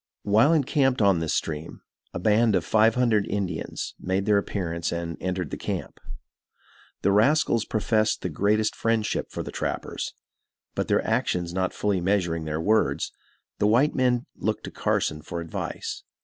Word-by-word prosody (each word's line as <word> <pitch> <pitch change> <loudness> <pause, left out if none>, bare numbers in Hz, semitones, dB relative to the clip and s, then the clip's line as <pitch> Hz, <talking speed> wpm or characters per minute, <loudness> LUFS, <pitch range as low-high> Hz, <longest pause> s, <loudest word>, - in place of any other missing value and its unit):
While 110 +8 +4
encamped 140 -4 +2
on 100 -5 +4
this 80 -2 -1
stream, 80 0 -4 0.3
a - - -5
band 105 +4 +3
of 85 -4 0
five 110 0 +4
hundred 115 -5 +2
Indians 95 -5 -3
made 95 +2 -1
their 105 -1 +4
appearance 85 -5 -3
and 85 -1 -3
entered 90 -3 -2
the - - -3
camp. - - -5 1.0
The 100 - +4
rascals 115 +1 +3
professed 110 0 +1
the 90 - -1
greatest 105 +6 +1
friendship 115 -2 0
for - - -5
the - - -7
trappers, - - -4 0.6
but - - -2
their - - +2
actions 85 -1 0
not 95 0 0
fully 100 -3 0
measuring 85 -4 0
their 75 0 -2
words, 110 +6 +1 0.5
the 105 - +3
white 125 +8 +4
men 125 -2 +1
looked - - -2
to - - -6
Carson 75 0 -1
for 85 +3 -5
advice. 85 -1 -5
100 Hz, 160 wpm, -26 LUFS, 85-110 Hz, 1.0 s, While